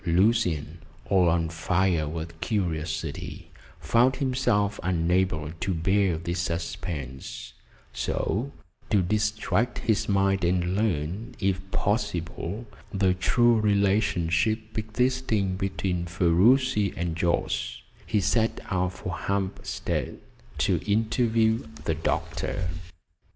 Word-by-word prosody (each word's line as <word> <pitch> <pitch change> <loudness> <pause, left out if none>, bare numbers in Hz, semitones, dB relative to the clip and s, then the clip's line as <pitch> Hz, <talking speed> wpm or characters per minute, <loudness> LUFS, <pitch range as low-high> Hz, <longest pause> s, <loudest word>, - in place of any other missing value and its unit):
Lucian, 90 -4 +2 0.3
all 90 -3 +5
on 80 0 +2
fire 85 -1 +1
with 80 +1 -6
curiosity, 85 -6 -3 0.3
found 125 +3 +3
himself 125 -7 +1
unable 85 -3 +1
to 95 +2 -1
bear 95 +1 +2
this 85 +1 -3
suspense, 85 -5 -4 0.4
so 125 +8 -1 0.4
to 105 - +4
distract 110 +4 0
his 110 -2 0
mind 95 -1 +2
and 90 +1 +1
learn, 100 - -1
if 95 -2 0
possible, 105 0 -2 0.3
the 95 -2 +2
true 115 +5 +3
relationship 100 0 +1
existing 110 -3 0
between 95 -2 -2
Ferruci 100 +6 +3
and 85 -2 -2
Jorce, 85 +1 -1 0.2
he 105 - +2
set 110 +3 +1
out 90 0 0
for 90 - -5
Hampstead 100 -1 -2 0.4
to - - +2
interview 110 +1 +2 0.2
the 80 - +1
doctor. 85 +2 -2
95 Hz, 100 wpm, -26 LUFS, 85-110 Hz, 0.4 s, all